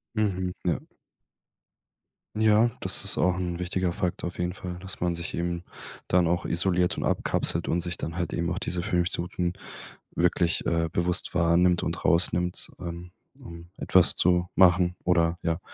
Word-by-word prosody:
Mhm. 95 -4 -1
Ja. 85 - +1 1.6
Ja, 110 +1 +4
das - - 0
ist - - +2
auch 90 0 +2
'n 90 -1 -3
wichtiger 90 0 -1
Faktor 90 0 -2
auf 85 - -8
jeden 90 0 -1
Fall, 90 -1 -7
dass 95 0 -7
man 85 -1 0
sich 85 0 -6
eben 85 0 -3 0.5
dann 90 -1 +3
auch 85 +1 0
isoliert 90 +1 +1
und - - -2
abkapselt - - +1
und 85 - +1
sich 85 0 -1
dann 85 +2 -6
halt 85 - -3
eben 85 +1 -1
auch 95 - -2
diese 90 -3 -3
15 90 -1 0
Minuten 90 -1 -1 0.6
wirklich 85 0 +1
äh, 85 -1 0
bewusst 90 0 0
wahrnimmt 85 +1 +3
und - - -3
rausnimmt, 90 +1 +1
ähm, 85 0 -7 0.3
ähm, 85 0 -11
etwas 95 -2 +4
zu 90 0 +2
machen 90 -1 +4
oder, 85 -1 +2
ja, 85 -1 -1
90 Hz, 165 wpm, -26 LUFS, 85-90 Hz, 1.6 s, Ja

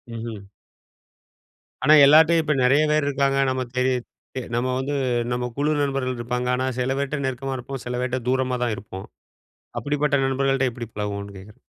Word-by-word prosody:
ம்ஹ்ம். 110 -4 -7 1.3
ஆனா, 150 +3 +6
எல்லார்ட்டையும், 160 +3 +6
இப்ப 155 -1 +1
நெறைய 135 +4 +4
பேர் 150 -1 +2
இருப்பாங்க. 140 -1 +1
நமக்கு 130 -2 -3
தெரியுது. 125 -1 +1 0.5
நம்ம 125 +2 0
வந்து, 140 +2 -2 0.4
நம்ம 125 0 -1
குழு 145 +2 +1
நண்பர்கள் 135 -3 -1
இருப்பாங்க. 125 +1 -2
ஆனா, 130 +1 -1
சில 130 +2 0
பேர்ட்ட 140 +1 -2
நெருக்கமா 130 +1 -3
இருப்போம். 130 +1 -7
சில 125 0 -3
பேர்ட்ட 125 0 -1
தூரமா 130 -1 0
தான் 120 -3 0
இருப்போம். 95 -1 -9 0.7
அப்படிப்பட்ட 145 0 0
நண்பர்கள்ட்ட 135 0 +1
எப்படி 120 0 -7
பழகுவோன்னு 100 -1 -5
கேக்குறேன். 100 +3 -15
130 Hz, 155 wpm, -23 LUFS, 120-140 Hz, 1.3 s, ஆனா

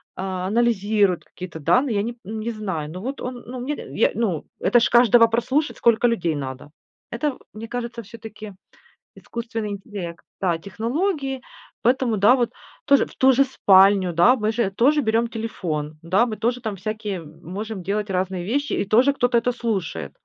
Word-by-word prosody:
а 185 -1 -3
анализирует 210 -4 +2
какие-то 180 -3 -9
данные. 250 - +2
Я 200 - +2
не 235 +2 -3
п 240 - -28
не 220 +3 -4
знаю, 190 -9 -4
но 180 +3 -7
вот 265 +6 -5
он, 250 -1 -6
ну, 250 +1 -6
мне, 275 +5 -3 0.2
я, - - +2
ну, 195 -9 -1
это 240 +6 +4
ж - - +3
каждого 235 -1 +6
прослушать, 260 +6 0
сколько 235 +1 +3
людей 175 -9 0
надо. 135 0 -6 0.4
Это, 260 +3 -2 0.2
мне 220 +1 -8
кажется, 235 0 -5
всё-таки 215 -1 -10 0.6
искусственный 230 -2 -5
интеллект, 195 -4 -7 0.2
да, 175 -3 +1
технологии. 270 - -2 0.4
Поэтому, 245 -1 +2
да, 205 +5 +6
вот 240 -3 0 0.3
тоже, 280 -1 +5
в - - -16
ту 265 0 +5
же 270 +2 +5
спальню, 195 -7 +4
да, 175 +10 +6
мы 215 -3 0
же 225 -3 0
тоже 265 +10 +3
берем 225 -1 +1
телефон, 175 -10 -4
да, 190 +8 +3
мы 220 -3 -5
тоже 240 +2 -1
там 215 -3 -3
всякие 210 0 -4
м 155 0 -14
можем 200 +3 -5
делать 205 +2 -2
разные 185 -1 -2
вещи, 285 +1 0
и - - -1
тоже 240 +7 +4
кто-то 245 -3 +2
это 245 +2 0
слушает. 190 - -3
220 Hz, 180 wpm, -23 LUFS, 190-240 Hz, 0.6 s, каждого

